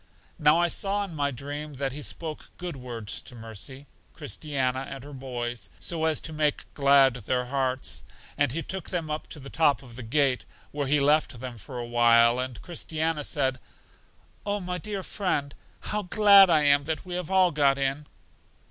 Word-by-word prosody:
Now 150 +1 +5
I 175 0 +3
saw 200 +3 +1
in 195 -4 -7
my 145 -2 0
dream 145 +3 -6
that 135 0 -2
he 145 +3 -6
spoke 155 +1 -5
good 175 -3 -5
words 120 -5 -4
to 125 - -12
Mercy, 115 +5 -7 0.3
Christiana, 140 -4 -2
and 135 -2 -7
her 145 +1 -10
boys, 120 -5 -5
so 160 -2 0
as 160 -2 +2
to 160 - -5
make 150 -1 0
glad 140 -2 +5
their 125 +2 -2
hearts. 130 - -2 0.3
And 145 -4 +2
He 165 +5 -2
took 190 -2 -5
them 165 -4 -2
up 150 - -4
to 150 - -6
the 135 0 -10
top 145 -3 +2
of 120 -3 -13
the 130 - -7
gate, 130 +2 +1 0.3
where 145 -1 -2
He 150 +2 +3
left 145 -3 +2
them 120 -2 -7
for 125 +5 -9
a 120 - -4
while, 120 0 +5
and 130 -4 -3
Christiana 160 -2 -2
said: 130 -3 0 0.8
Oh 205 0 -1
my 180 -1 -4
dear 200 +2 -5
friend, 145 -10 -2 0.3
how 210 - -2
glad 200 0 +7
am 145 -3 +5
I - - -14
that 160 +4 -3
we 180 - -6
have 180 -1 -3
all 190 -2 +4
got 140 -2 +3
in! 140 +2 -1
145 Hz, 190 wpm, -27 LUFS, 130-160 Hz, 0.8 s, glad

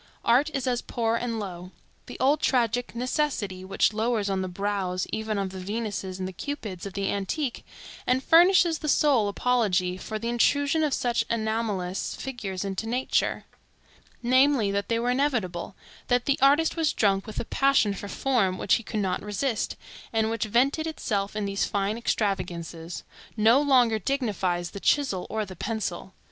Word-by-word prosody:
Art 260 +6 +4
is 270 - -1
as 245 -2 0
poor 230 -1 -1
and 230 -1 -2
low. 180 -3 -6 0.4
The - - -8
old 285 +4 +3
tragic 245 -1 +1
Necessity, 240 -7 -1
which 195 +3 +1
lowers 220 -2 0
on 190 -1 0
the 185 - -2
brows 185 -1 -2
even 220 -1 -2
of 195 -1 -2
the 190 - -7
Venuses 200 -1 -4
and 185 -1 -3
the 190 - -7
Cupids 205 - -5
of 195 - -9
the 195 0 -1
antique, 235 +7 -2 0.4
and 255 +2 +2
furnishes 345 -1 +5
the 305 - -3
sole 275 -8 +3
apology 200 -5 +1
for 215 +3 -5
the 230 +2 -4
intrusion 285 +6 +2
of 295 -3 +1
such 240 -1 0
anomalous 220 -5 -2
figures 200 -8 -5
into 195 +3 -3
nature,—namely, 255 0 0
that 200 0 -2
they 230 - +2
were 240 +2 +1
inevitable; 235 -10 -1 0.3
that 245 -1 +2
the 280 - +1
artist 290 +4 +4
was 325 -3 +1
drunk 195 -1 +1
with 215 - -5
a - - -3
passion 275 -7 +3
for 200 - -7
form 200 -6 +1
which - - +1
he 230 - -8
could 215 -1 -3
not 185 -2 -1
resist, 210 +3 -2 0.4
and 220 -1 +1
which 230 -1 -1
vented 270 +8 +2
itself 205 -10 -2
in 210 -1 -1
these 200 0 0
fine 200 +1 -1
extravagances,—no 195 - -1
longer 250 -6 +4
dignifies 190 -8 -1
the 200 - -7
chisel 245 -7 +1
or 220 -1 -2
the 185 -1 -10
pencil. 190 -2 -4
220 Hz, 165 wpm, -26 LUFS, 195-255 Hz, 0.4 s, furnishes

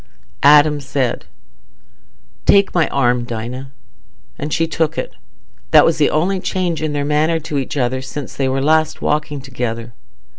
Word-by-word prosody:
Adam 150 +1 +6
said, 130 -2 -2 1.2
"Take 200 -1 +4
my 170 -4 +2
arm, 125 -2 +1
Dinah," 120 +3 -6 0.7
and 145 +2 -4
she 165 - +1
took 160 -1 -1
it. - - -4 0.6
That - - +7
was 165 -1 +1
the 150 - +4
only 185 +5 0
change 180 -3 -2
in 155 -1 -2
their 145 -1 -1
manner 155 +3 +1
to 150 -2 -3
each 135 +2 -4
other 130 0 0
since 130 +1 -7
they 135 -1 -1
were 135 +1 -1
last 155 +1 +1
walking 150 -1 -1
together. 120 -3 -5
145 Hz, 155 wpm, -18 LUFS, 130-155 Hz, 1.2 s, That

